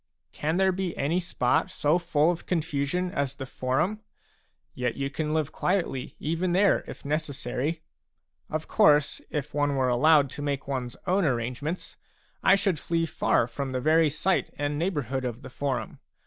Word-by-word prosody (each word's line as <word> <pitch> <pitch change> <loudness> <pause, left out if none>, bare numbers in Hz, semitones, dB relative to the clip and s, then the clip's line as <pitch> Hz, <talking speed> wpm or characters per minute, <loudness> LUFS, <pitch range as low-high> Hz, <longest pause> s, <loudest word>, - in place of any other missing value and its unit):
6 - - -19
Can 160 +3 0
there 190 0 +4
be 185 -1 -3
any 155 +6 +1
spot 170 -8 +1
so 150 +4 +2
full 165 -1 +2
of 175 - -6
confusion 165 +1 -1
as 140 -4 -1
the 135 - -6
Forum? 135 +12 -1 0.7
Yet 125 -2 -2
you 140 0 -2
can 150 +1 -2
live 155 -1 0
quietly 175 -9 -1
even 165 +3 -1
there, 200 +2 +4
if - - -9
necessary. 150 0 -2 0.7
Of 155 0 -3
course, 150 0 +4
if 150 -1 -4
one 145 -1 +1
were 130 -1 +2
allowed 145 +2 +4
to 145 - -6
make 140 -2 -2
one's 125 -3 -3
own 190 +1 +2
arrangements, 130 +5 -2 0.4
I 190 - +6
should 195 -5 0
flee 165 -1 0
far 150 - +2
from 130 +3 -5
the 130 - 0
very 155 +3 +4
sight 165 +6 0
and 145 0 -1
neighbourhood 145 - -1
of 120 -2 -4
the 130 - -9
Forum. 130 -5 -3
150 Hz, 170 wpm, -27 LUFS, 135-170 Hz, 0.7 s, I